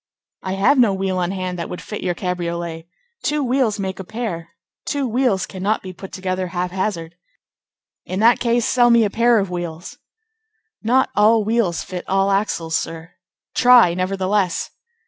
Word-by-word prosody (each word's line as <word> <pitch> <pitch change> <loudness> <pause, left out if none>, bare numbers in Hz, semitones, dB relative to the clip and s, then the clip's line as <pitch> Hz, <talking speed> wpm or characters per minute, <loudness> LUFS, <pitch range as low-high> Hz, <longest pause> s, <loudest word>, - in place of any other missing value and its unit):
"I 190 - -3
have 205 +9 +3
no 215 -6 +4
wheel 190 -1 -1
on 175 -1 0
hand 185 -2 -4
that 170 - -4
would 180 - -6
fit 210 - -7
your 180 -1 -1
cabriolet. 170 -2 -4 0.3
Two 300 0 0
wheels 250 -4 +1
make 190 -1 -4
a - - -4
pair. 190 -6 -5 0.3
Two 285 -3 -2
wheels 235 -5 +1
cannot 200 +3 -2
be 185 -1 -7
put 190 +2 -10
together 185 -1 -3
hap 180 0 -3
hazard." 180 -3 -3 0.9
"In 185 - -4
that 230 +3 +5
case, 235 -1 +1
sell 245 -1 +4
me 235 -1 +5
a 205 - 0
pair 235 +1 +3
of 195 -3 -1
wheels." 175 -1 -6 0.8
"Not 250 +4 +2
all 215 +2 +4
wheels 215 -5 0
fit 180 -1 -6
all 195 +1 +2
axles, 170 -5 -1
sir." 165 +1 -4 0.4
"Try, 245 -8 +6
nevertheless." 190 0 -1
195 Hz, 165 wpm, -20 LUFS, 180-225 Hz, 0.9 s, Try